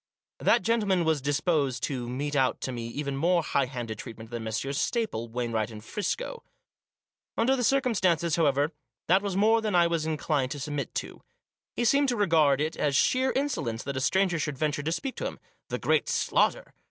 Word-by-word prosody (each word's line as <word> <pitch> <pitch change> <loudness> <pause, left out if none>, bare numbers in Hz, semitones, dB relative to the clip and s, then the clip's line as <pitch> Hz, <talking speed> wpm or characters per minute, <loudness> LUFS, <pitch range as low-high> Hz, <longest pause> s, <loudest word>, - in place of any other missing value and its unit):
That - - +3
gentleman 205 -6 +2
was 160 -3 +1
disposed 145 -2 0
to 125 -4 -2
mete 145 +4 -3
out 130 -2 +2
to 130 - -3
me 120 -2 -5
even 140 +3 -4
more 170 +4 +2
high 140 -2 +1
handed 120 -4 -5
treatment 115 -1 -9
than 120 -1 -4
Messrs 115 +6 -2
Staple, 220 - -1
Wainright 115 -2 -2
and 105 -2 -10
Friscoe. 465 - -3 1.0
Under 260 +4 +3
the 250 - -1
circumstances, 190 - +2
however, 145 -2 +2 0.3
that 190 +3 +4
was 200 -2 -3
more 220 +3 +4
than 215 -4 -1
I 175 -1 +6
was 165 -2 0
inclined 150 -4 0
to 145 - -7
submit 145 0 -4
to. - - -5 0.5
He 240 - 0
seemed 280 +3 +4
to 245 - +1
regard 160 - +3
it 155 +2 -1
as 145 -2 0
sheer 260 - +3
insolence 145 - -2
that 140 0 -4
a 130 - -1
stranger 180 +4 +2
should 145 -2 -2
venture 145 0 0
to 155 +3 -2
speak 260 +10 -3
to - - -2
him - - -7 0.2
— - - -47
the - - -2
great - - +1
Slaughter! - - +1
150 Hz, 195 wpm, -28 LUFS, 130-200 Hz, 1.0 s, I